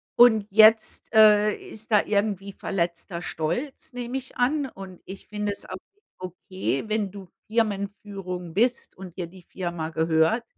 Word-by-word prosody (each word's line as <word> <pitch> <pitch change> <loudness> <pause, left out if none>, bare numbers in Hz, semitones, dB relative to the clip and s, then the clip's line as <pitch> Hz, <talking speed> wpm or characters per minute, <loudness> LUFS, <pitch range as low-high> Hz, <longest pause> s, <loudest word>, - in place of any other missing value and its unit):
und 220 -4 +6
jetzt, 220 +2 +5
äh, 210 -1 +6
ist 220 +1 -10
da 210 -2 +5
irgendwie 200 -1 -1
verletzter 170 -1 -3
Stolz, 240 - -3
nehme 245 +1 -4
ich 265 0 -9
an. 275 +3 +1
Und, 190 -4 -11
ich 190 0 -10
finde 210 0 -2
es - - -10
auch 185 - -6 0.2
nicht 415 - -39 0.2
okay, 185 -4 -3
wenn 215 -2 0
du 200 -2 -10 0.2
Firmenführung 200 -5 -3
bist 240 +6 0
und 185 -1 -10
dir 175 - -3
die 185 +2 -15
Firma 175 -4 -4
gehört, 160 +7 +2
200 Hz, 155 wpm, -25 LUFS, 180-220 Hz, 0.2 s, und